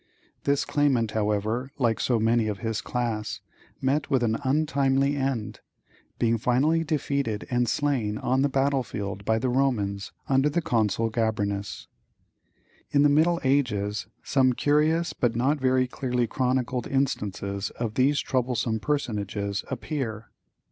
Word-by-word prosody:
This 140 0 +2
claimant, 130 -7 +1
however, 110 +4 -1
like 115 -5 +1
so 120 - +2
many 115 0 +2
of 105 -2 -2
his 110 +1 -2
class, 115 -3 -3 0.4
met 140 +3 0
with 130 -3 +2
an 115 -1 +1
untimely 140 -1 +2
end, 135 -6 -2 0.6
being 115 -1 +1
finally 145 +8 +2
defeated 140 -8 -1
and 120 -1 +2
slain 120 -7 0
on 130 +4 +1
the 140 - +2
battlefield 130 -8 -1
by 110 +1 +2
the 125 +3 0
Romans, 110 -7 0 0.2
under 135 +2 +3
the 150 - 0
Consul 115 - 0
Gabrinus. 105 -3 -2 1.0
In 145 0 +3
the 145 - +5
middle 165 +4 +3
ages 105 -8 0 0.2
some 130 -3 +3
curious 155 +5 +2
but 120 -2 0
not 135 +5 +1
very 130 -1 +3
clearly 125 -1 -1
chronicled 125 0 -1
instances 100 -7 -1
of 115 -3 -4
these 140 +4 +3
troublesome 120 -3 0
personages 105 -7 -2
appear. 125 -5 -4
125 Hz, 135 wpm, -26 LUFS, 110-140 Hz, 1.0 s, the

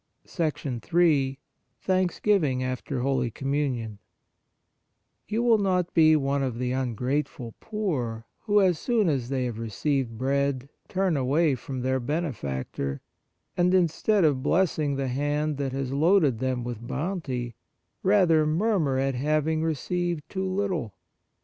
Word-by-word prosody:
Ill 145 -1 +1 0.4
Thanksgiving 185 -7 +1
after 130 0 -3
Holy 130 -2 0
Communion 130 -5 -2 1.3
You 220 +3 -1
will 230 -3 +4
not 180 -3 0
be 155 -2 +6
one 140 -1 0
of 130 -4 -2
the 125 0 -1
un 130 -3 -1
grateful 125 -1 -2
poor 135 - -3 0.2
who, 205 -1 +4
as 180 -5 +3
soon 230 -5 +1
as 130 -5 -1
they 130 -2 -1
have 115 -2 -4
received 115 +2 -1
bread, 140 +1 0 0.2
turn 190 -3 0
away 145 +3 +2
from 130 +1 -5
their 130 +1 0
benefactor, 95 - -3 0.5
and, 180 +1 +3
instead 185 +3 +2
of 145 -5 +3
blessing 155 -2 +1
the 135 -1 -2
hand 145 +3 -1
that 140 -2 -2
has 135 -1 -3
loaded 150 - +3
them 130 -1 -1
with 120 -1 -6
bounty, 135 -7 -3 0.5
rather 180 -6 +4
murmur 160 -5 +1
at 135 0 +1
having 155 +4 0
received 165 +1 -2
too 190 -1 -2
little. 185 - -2
140 Hz, 130 wpm, -26 LUFS, 130-175 Hz, 1.3 s, be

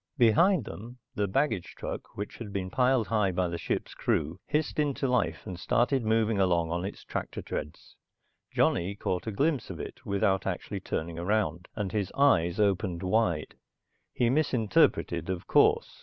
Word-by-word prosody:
Behind 155 - +4
them 120 +5 -9 0.2
the 100 0 0
baggage 110 - -1
truck, - - -6
which 105 +1 -5
had 110 -4 -7
been 95 -2 -3
piled 125 -1 +3
high 105 -4 +2
by 90 0 0
the 85 0 -4
ship's - - -3
crew, 80 +3 -1
hissed 150 +1 -1
into 145 -2 0
life 125 -1 0
and 95 -4 -6
started 125 +8 +1
moving 110 -1 +2
along 85 -3 +2
on 85 +1 -1
its 100 - -6
tractor - - -4
treads. 75 0 -6 0.5
Johnny 95 +4 +1
caught 90 0 -3
a - - -1
glimpse 140 +4 0
of - - -7
it, - - -8
without 100 -1 +1
actually - - -3
turning 85 +1 -4
around, 90 -2 0
and 105 -4 -2
his 100 -3 -1
eyes 95 -11 +3
opened 95 -3 +1
wide. 90 -5 +1 0.6
He 120 -1 +1
misinterpreted, 110 - +2
of 90 -2 -3
course. - - +3
100 Hz, 165 wpm, -29 LUFS, 90-120 Hz, 0.6 s, Behind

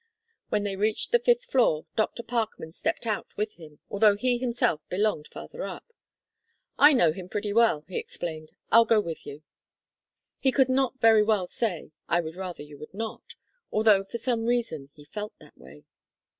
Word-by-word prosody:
When 210 -1 0
they 200 -1 -2
reached 210 +2 0
the 480 - +5
fifth 485 0 +2
floor, 235 - +2
Dr. 225 +2 -1
Parkman 225 -8 -3
stepped 180 - -3
out 215 -3 -2
with 210 +1 -2
him, 155 -3 -13
although 205 0 +4
he 245 +3 0
himself 240 -11 0
belonged 195 -5 0
farther 485 - -9
up. 465 - -8 0.8
"I 295 - +7
know 175 - +4
him 180 +2 -8
pretty 205 0 -2
well," 220 -10 +3
he 185 - -3
explained, 155 -2 -7 0.2
"I'll 230 +1 +8
go 225 -1 +4
with 170 -6 -5
you." 145 +2 -9 1.0
He 265 - +2
could 265 0 +3
not 260 0 +1
very 225 -2 +6
well 210 -3 +2
say: 180 -4 -3 0.2
"I 170 - +3
would 160 -1 -5
rather 185 -4 -6
you 145 -1 -13
would 150 +5 -11
not," 225 +1 -6 0.4
although 215 -2 +4
for 195 +4 -6
some 230 -1 -1
reason 230 - -1
he 145 - -15
felt 210 +7 -7
that - - -18
way. 70 +3 -15
210 Hz, 180 wpm, -27 LUFS, 170-235 Hz, 1.0 s, I'll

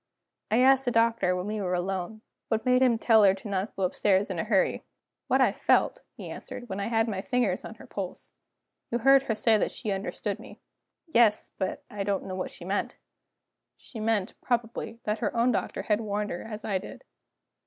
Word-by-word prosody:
I 225 +3 +3
asked 270 0 +5
the 245 - +1
Doctor, 230 -5 +2
when 180 0 -3
we 210 0 -3
were 180 -2 0
alone, 190 +4 -3 0.3
what 225 0 -1
made 250 0 +4
him 245 -3 +4
tell 220 -1 +5
her 195 -1 +6
not 195 -1 -1
to - - -33
go 195 - -2
upstairs 190 +2 +2
in 180 - -3
a - - 0
hurry. 210 -3 +1 0.4
"What - - +3
I - - +5
felt," - - +2 0.2
he - - -7
answered, 245 - -8
"when 190 - -4
I 200 - -2
had 225 0 +1
my 195 -4 -2
fingers 235 -5 0
on 220 - -8
her - - -13
pulse. 190 -3 -7 0.6
You 235 - 0
heard 270 +3 +6
her 235 -5 -2
say 220 0 +3
that - - +1
she 215 - -4
understood 195 0 -3
me." - - -12 0.5
"Yes; 235 - +3
but 190 -1 -3
I 205 -1 -4
don't 195 -1 -1
know 190 - -5
what 185 - -3
she - - -11
meant." - - -2 0.8
"She 230 - -11
meant, 215 -3 0
probably, 230 -1 -2
that 210 +1 -1
her 235 - -2
own 240 +2 +4
doctor - - -2
had 210 +1 +1
warned 210 -1 -2
her 175 - -5
as 215 -1 -7
I 195 -3 0
did." - - -10
215 Hz, 210 wpm, -28 LUFS, 195-230 Hz, 0.8 s, her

